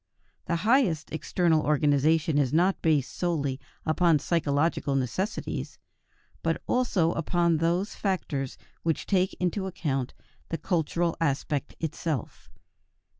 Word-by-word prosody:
The 170 - 0
highest 220 - +3
external 160 0 +2
organization 150 +1 +2
is 135 -4 +1
not 180 +5 +2
based 150 -5 +1
solely 145 -7 -1 0.3
upon 165 0 +4
psychological 145 -2 0
necessities, 135 - -2 0.6
but - - 0
also 205 -10 +2
upon 170 0 +1
those 170 +5 0
factors 150 -9 -2 0.2
which 165 -1 -1
take 185 -1 +1
into 185 +2 -1
account 135 -8 -2 0.3
the 165 - -2
cultural 170 0 0
aspect 145 -1 -1
itself. 160 -4 -4
165 Hz, 110 wpm, -27 LUFS, 145-175 Hz, 0.6 s, upon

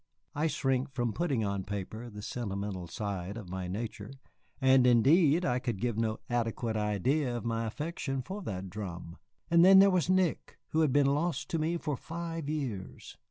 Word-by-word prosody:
I 150 +2 +1
shrink 135 -2 0
from 120 -4 -2
putting 140 -11 0
on 100 -1 -2
paper 105 +4 -5
the 105 -2 -9
sentimental 100 -5 -4
side 100 0 -4
of 100 -6 -8
my 95 -1 -4
nature, 105 +1 -5 0.5
and 130 -1 +5
indeed 150 +8 +5
I 125 -1 +1
could 120 -5 -3
give 120 0 -1
no 110 0 0
adequate 115 -1 -1
idea 120 - 0
of 120 - -7
my 115 0 -1
affection 135 0 -3
for 195 +10 -6
that 95 - -5
drum. 90 -4 -7 0.3
And 170 0 +6
then 190 +1 +9
there 195 0 +7
was 180 -1 +1
Nick, 185 -3 +1
who 160 - 0
had 155 -4 +3
been 145 +1 +4
lost 150 +5 0
to 165 - 0
me 165 +2 0
for 150 -3 -2
five 165 0 -5
years! 130 -12 -5
120 Hz, 180 wpm, -30 LUFS, 105-155 Hz, 0.5 s, then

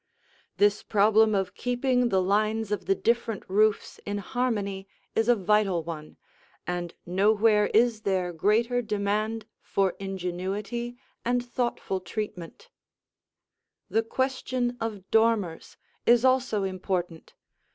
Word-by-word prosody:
This 205 0 +3
problem 215 +1 +4
of 195 -1 -1
keeping 245 0 +1
the 190 -3 +2
lines 215 +2 +1
of 210 - -2
the 195 - +3
different 230 -2 -1
roofs 210 +2 +1
in 205 0 -3
harmony 200 -4 -2 0.3
is 225 +1 +2
a 245 - +6
vital 195 -3 +2
one, 155 -2 -8 0.5
and 175 -1 -4
nowhere 210 +3 +3
is 225 0 +2
there 185 -4 -1
greater 230 +8 +2
demand 215 +1 -1 0.2
for 195 -2 0
ingenuity 195 +5 -4 0.3
and 245 +1 0
thoughtful 240 -6 -2
treatment. 210 - -6 1.2
The 225 - +3
question 255 0 -1
of 215 -4 -3
dormers 220 -7 +1 0.3
is 240 +1 +5
also 255 -5 +2
important. 185 -3 -3
210 Hz, 115 wpm, -27 LUFS, 195-235 Hz, 1.2 s, a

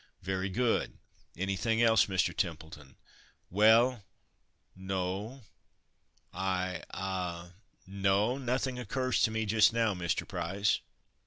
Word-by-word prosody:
"Very 95 +1 -2
good. 115 +4 0 0.4
Anything 100 +5 -1
else, 115 -2 +5
Mr. 95 -2 0
Templeton?" 80 -6 -5 0.6
"Well 110 +4 +4 0.7
no 95 +6 -4 0.9
I 95 -2 -2
ah 90 -3 -4 0.3
no! 100 +6 +1
nothing 130 0 -2
occurs 130 +2 -1
to - - +4
me 110 0 -2
just 110 +1 +4
now, 115 -2 +2
Mr. 90 -2 -2
Price." 95 +2 0
100 Hz, 100 wpm, -31 LUFS, 95-115 Hz, 0.9 s, else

